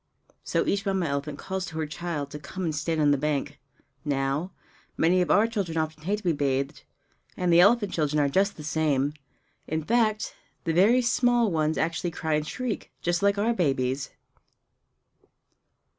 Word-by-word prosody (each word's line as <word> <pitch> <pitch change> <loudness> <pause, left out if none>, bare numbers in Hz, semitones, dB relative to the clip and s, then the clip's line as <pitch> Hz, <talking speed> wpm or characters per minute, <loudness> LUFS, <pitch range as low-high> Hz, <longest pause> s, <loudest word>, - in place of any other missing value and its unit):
So - - 0
each 200 0 0
Mamma 190 -3 0
elephant 140 0 -3
calls 190 +2 -4
to 160 - -7
her 160 - -1
child 150 -2 -4
to 150 - -6
come 185 +6 -6
and 160 -3 -1
stand 155 +2 -1
on 145 -1 +4
the 145 - +2
bank. 145 -1 -2 0.4
Now, 140 +4 -1 0.5
many 180 +3 +3
of 180 - 0
our 205 +3 +5
children 200 -8 -2
often 155 -1 -3
hate 205 +3 +1
to 210 - -11
be 175 - +2
bathed; 140 0 -1 0.6
and 180 -1 +2
the 170 - +7
elephant 205 +2 +4
children 150 -2 +1
are 145 - +3
just 195 +8 +1
the 155 - -8
same! 150 -2 +1 0.5
In 160 0 -2
fact, 215 +2 +1 0.3
the 165 - 0
very 220 +9 +5
small 240 -2 +3
ones 155 -1 +1
actually 165 +2 -1
cry 160 -1 -3
and 150 0 0
shriek, 250 +2 -4
just 175 0 +1
like 200 0 +3
our 225 +4 +2
babies! 135 - 0
160 Hz, 175 wpm, -26 LUFS, 150-195 Hz, 0.6 s, the